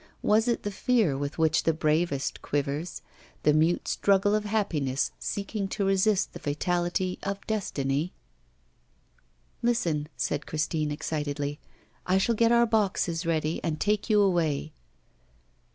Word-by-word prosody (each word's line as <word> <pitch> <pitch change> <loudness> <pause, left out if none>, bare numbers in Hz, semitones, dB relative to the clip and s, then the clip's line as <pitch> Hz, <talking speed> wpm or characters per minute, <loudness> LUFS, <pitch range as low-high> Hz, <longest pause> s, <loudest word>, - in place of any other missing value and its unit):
Was 220 +3 +3
it 235 - 0
the 205 - -2
fear 215 - +2
with 140 +2 -4
which 160 -1 +3
the 165 - +1
bravest 155 -3 0
quivers, 145 +4 -3 0.4
the 150 - +5
mute 160 +3 +2
struggle 200 +1 +2
of 215 0 +1
happiness 160 -11 0
seeking 200 0 -3
to 195 +1 -2
resist 195 +1 +2
the 175 - -8
fatality 175 +4 -1
of 200 0 -4
destiny? 155 -7 -1 1.5
'Listen,' 170 -11 0
said 140 +4 -2
Christine, 155 0 -1
excitedly. 145 -1 -3 0.5
'I 185 +1 +3
shall 195 +5 +2
get 230 +1 +3
our 235 0 +5
boxes 190 -6 0
ready, 160 -1 0
and 155 -2 -2
take 210 +1 0
you 210 -1 +5
away. 160 -5 0
175 Hz, 135 wpm, -27 LUFS, 150-205 Hz, 1.5 s, the